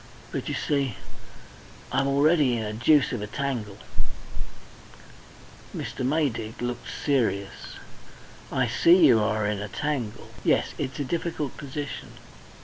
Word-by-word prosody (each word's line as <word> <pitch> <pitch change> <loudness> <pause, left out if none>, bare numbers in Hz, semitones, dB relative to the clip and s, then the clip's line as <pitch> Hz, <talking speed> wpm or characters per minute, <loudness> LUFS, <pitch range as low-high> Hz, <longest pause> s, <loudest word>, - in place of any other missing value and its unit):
But, - - -3
you - - -1
see, 140 -6 0 1.0
I'm 135 +1 +2
already 140 -2 +4
in 110 - -2
a 105 0 -3
deuce 135 +6 +4
of 120 -5 -2
a 105 - -3
tangle 115 -4 -3 0.6
" - - -14
Mr. - - -4
Maydig 125 -6 0
looked 120 0 -3 0.2
serious. 115 -9 0 0.8
"I - - +2
see 170 0 +6
you 120 -6 +7
are 105 0 +1
in 105 -1 0
a 105 - -3
tangle. 135 -5 -3
Yes, - - +2
it's 130 - -2
a - - +1
difficult 160 -3 -2
position. 145 0 -6
130 Hz, 135 wpm, -27 LUFS, 110-145 Hz, 1.0 s, you